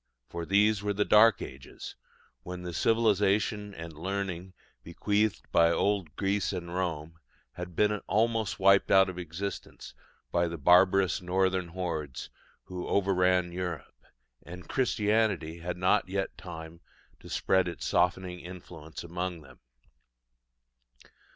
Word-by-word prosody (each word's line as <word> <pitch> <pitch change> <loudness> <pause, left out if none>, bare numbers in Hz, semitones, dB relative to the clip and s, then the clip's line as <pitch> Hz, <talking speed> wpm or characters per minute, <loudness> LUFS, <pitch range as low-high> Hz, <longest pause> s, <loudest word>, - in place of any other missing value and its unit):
For 85 -1 -5
these 105 +1 +3
were 105 0 -1
the 105 +1 +1
Dark 110 0 +5
Ages, 65 0 -9 0.5
when 90 0 -7
the 90 -1 -5
civilisation 105 0 +1
and 80 0 -8
learning 95 +2 -4 0.3
bequeathed 105 +5 0
by 85 0 +5
old 95 -4 0
Greece 100 0 0
and 85 -2 -5
Rome 85 -3 -3 0.3
had 90 -1 -8
been 105 +3 +3
almost 110 0 +1
wiped 95 0 +5
out 95 -1 +6
of 90 -1 -6
existence 90 +4 -6 0.4
by 85 0 +2
the 85 0 -5
barbarous 90 +5 +4
northern 95 0 0
hordes 80 -7 -5 0.3
who 90 -1 -6
overran 90 -2 +2
Europe; 90 -4 -6 0.4
and 90 +1 -11
Christianity 105 -9 0
had 90 +1 -4
not 90 0 +2
yet 95 0 -2
time 80 -1 -9 0.4
to - - -13
spread 95 -1 +2
its 85 - -5
softening 90 0 0
influence 85 -3 -10
among 90 0 -4
them. 65 -3 -17
90 Hz, 125 wpm, -29 LUFS, 85-100 Hz, 0.5 s, out